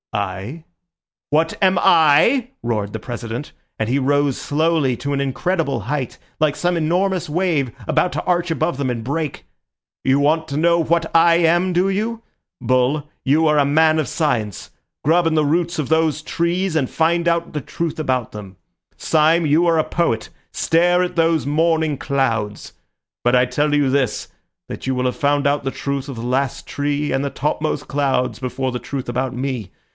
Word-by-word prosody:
"I? 100 - -4 0.6
What 160 +2 +1
am 190 -2 +4
I?" 170 - +4
roared 105 -4 -2
the 110 - -5
President, 120 +3 -6 0.3
and 110 - 0
he 130 +4 +1
rose 145 0 +1
slowly 155 -4 0
to 140 0 -3
an 140 - 0
incredible 140 - -1
height, 130 +3 -3 0.2
like 155 -2 +2
some 175 0 0
enormous 175 +2 0
wave 155 -6 0 0.2
about 180 - +1
to - - -3
arch 175 -2 0
above 160 -2 -1
them 140 -2 -1
and 120 -2 -3
break. 145 +3 -3 0.6
"You 135 +1 +3
want 160 +2 +1
to 140 - -3
know 170 +2 +3
what 165 0 0
I 165 0 +6
am, 175 +2 +2
do 180 +2 +2
you? 220 +4 -2 0.4
Bull, 130 +4 +1 0.2
you 155 +4 +3
are 150 -1 +3
a - - +5
man 155 +2 +3
of 155 - -1
science. 115 - -2 0.3
Grub 165 +3 +3
in 160 - +1
the 155 -1 +2
roots 170 +3 0
of 145 - -1
those 160 -1 +1
trees 170 +2 -1
and 140 -5 +1
find 170 +1 +1
out 170 0 0
the 150 - -3
truth 165 +4 -4
about 130 -6 -1
them. 100 -3 -9 0.4
Syme, 160 +1 +2
you 155 +4 +3
are 165 -1 +3
a 155 - +3
poet. 160 -12 -1 0.2
Stare 175 +2 +2
at 180 - -4
those 165 -4 +2
morning 160 0 +1
clouds. 115 -8 -2 0.5
But 120 +1 +3
I 125 0 +4
tell 145 +4 0
you 145 -2 +2
this, 130 -5 0 0.4
that - - -7
you 130 - 0
will 125 0 -1
have 125 - 0
found 145 -1 +1
out 145 +1 0
the 135 - -2
truth 140 0 -4
of 130 - -6
the - - -5
last 130 +2 -2
tree 145 0 -2
and 135 +1 0
the 140 - -1
top 150 +2 -2
most 155 - -2
cloud 135 -3 -1
before 130 0 -3
the 125 - -3
truth 135 0 -5
about 125 +1 -2
me. 125 -7 -4
145 Hz, 185 wpm, -20 LUFS, 130-165 Hz, 0.6 s, I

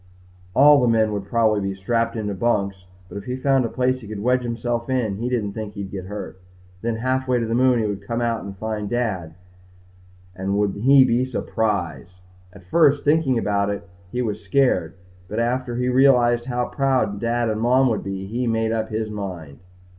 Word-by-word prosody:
All 145 0 +7
the 125 - +3
men 110 -2 +2
would 100 -1 -3
probably 110 -2 +2
be 95 0 -3
strapped 115 +4 -1
in 105 -2 -3
bunks 100 -5 -1 0.2
but 100 - -7
if 100 - -12
he 125 - -3
found 135 -1 +2
a - - -2
place 130 +1 0
he 110 - -10
could 105 -1 -6
wedge 125 +1 +2
himself 120 0 -3
in 120 -7 0
he 120 +3 -2
didn't 110 -5 -1
think 105 -1 -6
he'd 100 -1 -6
get 95 -2 -6
hurt. 105 -1 -7 0.4
Then, 115 0 -1
halfway 130 +2 0
to 115 - -1
the 115 - -2
moon 125 +1 +4
he 110 - 0
would 100 -1 -3
come 115 0 -1
out 115 -1 -1
and 100 -1 -8
find 105 0 -4
Dad 95 -10 -2 1.0
and 95 +2 -2
would 105 -1 +1
he 130 +7 +5
be 120 +1 +2
surprised! 105 -8 -2 0.4
At 95 -1 -16
first, 145 - +3
thinking 145 -4 +2
about 100 -2 0
it, 100 0 -4 0.2
he'd 125 0 -1
been 110 -3 -1
scared 95 -6 0 0.3
but 105 - -6
after 120 +1 -1
he 125 +1 -1
realized 125 -2 +4
how 125 -1 -1
proud 130 -8 0
Dad 120 +1 0
and 110 0 -1
Mom 130 +3 +4
would 105 - -2
be, 95 -1 -5
he 120 +5 -2
made 115 -1 0
up 110 -1 -1
his 110 0 -3
mind. 90 -9 -7
115 Hz, 200 wpm, -22 LUFS, 100-125 Hz, 1.0 s, All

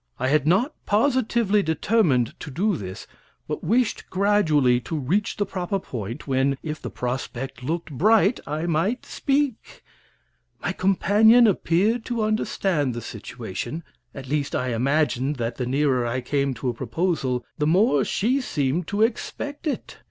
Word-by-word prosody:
I 130 +1 0
had 150 0 +2
not 220 - +3
positively 225 -2 +2
determined 160 - +1
to 150 - -7
do 190 +8 0
this, 95 - -7 0.4
but - - -4
wished 240 0 0
gradually 160 -11 +3
to 125 +7 -4
reach 170 +10 -1
the 205 - 0
proper 190 0 -2
point, 120 - -6
when, 135 0 +1
if 155 -1 -5
the - - -5
prospect 125 +1 -4
looked 165 +5 -3
bright, 210 - +3
I 155 +3 -2
might 175 +9 0
speak. 275 -4 -2 0.8
My - - -2
companion 210 +5 +5
appeared 210 +3 +2
to 235 -3 -1
understand 190 - 0
the 120 - -4
situation 115 - -6 0.3
at 135 -2 -8
least, 145 +1 -1
I 125 - -1
imagined 135 +3 +1
that 120 -2 -3
the 125 - -2
nearer 135 -1 +1
I 120 +2 -2
came 140 +1 -1
to 125 +3 -2
a - - -1
proposal 130 -1 -1
the 150 - +1
more 170 - +4
she 255 +7 0
seemed 155 - -1
to 205 +2 +1
expect 285 +6 -3
it. 295 - -4
160 Hz, 150 wpm, -24 LUFS, 130-210 Hz, 0.8 s, companion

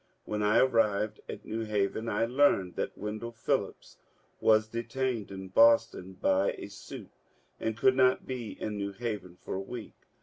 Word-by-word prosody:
When 105 0 -2
I 105 +1 +3
arrived 110 -4 +2
at - - -7
New 115 +1 -3
Haven 105 +1 -1
I 110 +1 +1
learned 120 -8 +2
that - - -3
Wendell 110 +3 -5
Phil 110 - +1
lips - - -17 0.4
was 110 0 +4
detained 115 0 -2
in 95 -1 -7
Boston 115 -3 +4
by 95 +1 +2
a - - -7
suit - - -10 0.5
and 110 -1 -2
could 130 +4 +4
not 130 -1 +3
be 125 -4 -6
in 105 -1 -3
New 100 0 -3
Haven 100 -5 -5
for - - -5
a 95 - -2
week. 115 +3 -7
110 Hz, 170 wpm, -30 LUFS, 100-115 Hz, 0.5 s, was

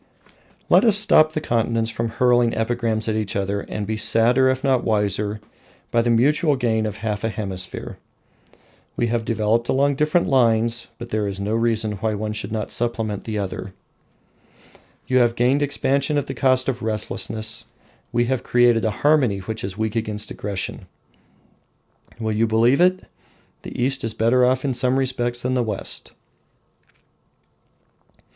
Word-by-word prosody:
Let - - +5
us 220 -4 +5
stop 155 -7 +4
the 155 - -1
continents 115 -2 0
from 115 0 -3
hurling 120 0 +2
epigrams 115 -1 -1
at 110 - 0
each 110 -2 -2
other, 100 +1 -1
and 105 +1 -5
be 110 +1 -3
sadder 120 +4 +3
if 130 +1 -1
not 130 -3 +2
wiser 105 0 0 0.5
by 115 - +3
the 120 - 0
mutual 145 +6 +3
gain 110 -4 0
of 105 -1 -6
half 105 -1 -2
a 115 - 0
hemisphere. 95 -4 -5 1.0
We 120 - 0
have 115 -1 0
developed 115 +1 0
along 140 +1 +2
different 155 +4 +2
lines, 115 -2 +2
but 120 0 -9
there 105 -1 0
is 100 -1 -5
no 100 +2 -2
reason 110 -2 0
why 110 +1 -1
one 105 +1 -3
should 105 -1 -5
not 110 -2 -3
supplement 110 -4 -2
the 110 -2 -3
other. 95 -1 -5 1.3
You 130 0 +2
have 120 -1 +2
gained 125 +4 +2
expansion 140 0 0
at 145 - 0
the - - -5
cost 130 -1 +2
of 130 -2 -2
restlessness; 110 +1 -2 0.5
we 120 0 +1
have 130 0 -1
created 120 -2 +3
a 110 - +1 0.2
harmony 140 -9 +4
which 110 +4 -6
is 95 0 -5
weak 110 0 -2
against 110 -2 -3
aggression. 100 -2 -5 1.3
Will 110 -1 -2
you 110 +2 +1
believe 115 +7 +3
it? 185 +1 +3 0.6
the - - -8
East 130 +2 0
is 115 -1 -2
better 120 +3 +3
off 130 +2 +2
in 135 - 0
some 125 +1 +1
respects 125 -2 -1
than 125 +1 0
the 125 - +1
West! 110 -4 -3
115 Hz, 165 wpm, -22 LUFS, 110-130 Hz, 1.3 s, Let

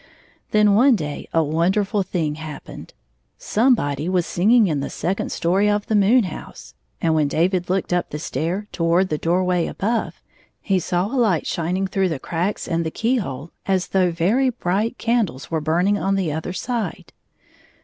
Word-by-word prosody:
Then 210 -1 +4
one 250 +5 +5
day 150 -6 -5
a 165 - +3
wonderftil 190 +7 +1
thing 160 -5 -2
happened. 155 -1 -9 0.4
Somebody 180 - +1
was 180 -2 +1
singing 220 +6 +4
in 155 -6 0
the 140 - -3
second 190 +3 -2
story 190 +5 +1
of 205 0 0
the 220 - 0
moon 215 +5 +5
house, 180 -5 -8 0.3
and 165 - +1
when 155 -2 +2
David 175 +4 0
looked 185 -1 0
up 175 - 0
the 150 - -5
stair 175 +6 -3
toward 170 +2 +1
the 150 - -2
door 175 +3 +1
way 180 -2 +1
above, 225 +3 -2 0.4
he 195 -3 0
saw 180 +1 -1
a 210 - -6
light 215 - +2
shining 180 +3 -1
through 190 0 0
the 160 - -2
cracks 175 +8 -3
and 165 0 0
the 160 - -2
keyhole 170 - -2 0.2
as 190 -2 +2
66 - - -14
though 185 -2 +3
very 205 +11 +2
bright 220 0 -1
candles 225 - -1
were 160 -1 0
burning 180 +7 +1
on 195 +1 0
the 185 -5 0
other 160 +4 -4
side. 230 +4 -4
185 Hz, 180 wpm, -21 LUFS, 165-205 Hz, 0.4 s, one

